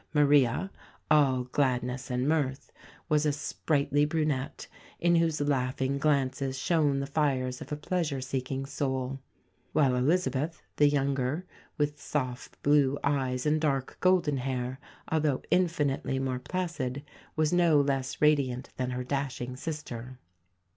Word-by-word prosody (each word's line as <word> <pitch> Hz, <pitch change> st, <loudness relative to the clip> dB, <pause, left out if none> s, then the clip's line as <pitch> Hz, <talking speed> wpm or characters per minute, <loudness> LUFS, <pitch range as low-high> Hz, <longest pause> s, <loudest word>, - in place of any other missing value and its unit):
Maria, 145 Hz, +4 st, +4 dB, 0.4 s
all 135 Hz, -4 st, +4 dB
gladness 125 Hz, -1 st, -1 dB
and 125 Hz, +1 st, 0 dB
mirth, 145 Hz, -4 st, 0 dB, 0.4 s
was 155 Hz, -2 st, +2 dB
a 150 Hz, -, +2 dB
sprightly 145 Hz, 0 st, 0 dB
brunette, 150 Hz, -3 st, -1 dB, 0.3 s
in 170 Hz, 0 st, +4 dB
whose 165 Hz, -2 st, +1 dB
laughing 135 Hz, -1 st, 0 dB
glances 135 Hz, -2 st, +1 dB
shone 145 Hz, -2 st, +2 dB
the 140 Hz, -, -2 dB
fires 135 Hz, -4 st, 0 dB
of -, -, -9 dB
a -, -, 0 dB
pleasure 150 Hz, -2 st, -1 dB
seeking 130 Hz, +1 st, -3 dB
soul; 135 Hz, -1 st, -2 dB, 0.5 s
while 140 Hz, -4 st, +3 dB
Elizabeth, 145 Hz, +2 st, 0 dB
the 145 Hz, -, +6 dB
younger, 140 Hz, +3 st, 0 dB, 0.3 s
with 145 Hz, 0 st, -1 dB
soft 130 Hz, -4 st, -4 dB
blue 145 Hz, -1 st, +4 dB
eyes 130 Hz, -3 st, 0 dB
and 150 Hz, +1 st, +2 dB
dark 135 Hz, -4 st, 0 dB
golden 180 Hz, -6 st, +3 dB
hair, 130 Hz, 0 st, -3 dB, 0.3 s
although 155 Hz, -4 st, +1 dB
infinitely 150 Hz, -7 st, +1 dB
more 130 Hz, -1 st, -1 dB
placid, 145 Hz, -5 st, -3 dB, 0.3 s
was 155 Hz, +1 st, +1 dB
no 170 Hz, -4 st, +5 dB
less 135 Hz, -2 st, -1 dB
radiant 140 Hz, -4 st, +2 dB
than 125 Hz, -1 st, -1 dB
her 125 Hz, 0 st, -3 dB
dashing 130 Hz, -2 st, -3 dB
sister. 130 Hz, -4 st, -6 dB
140 Hz, 130 wpm, -29 LUFS, 130-150 Hz, 0.5 s, the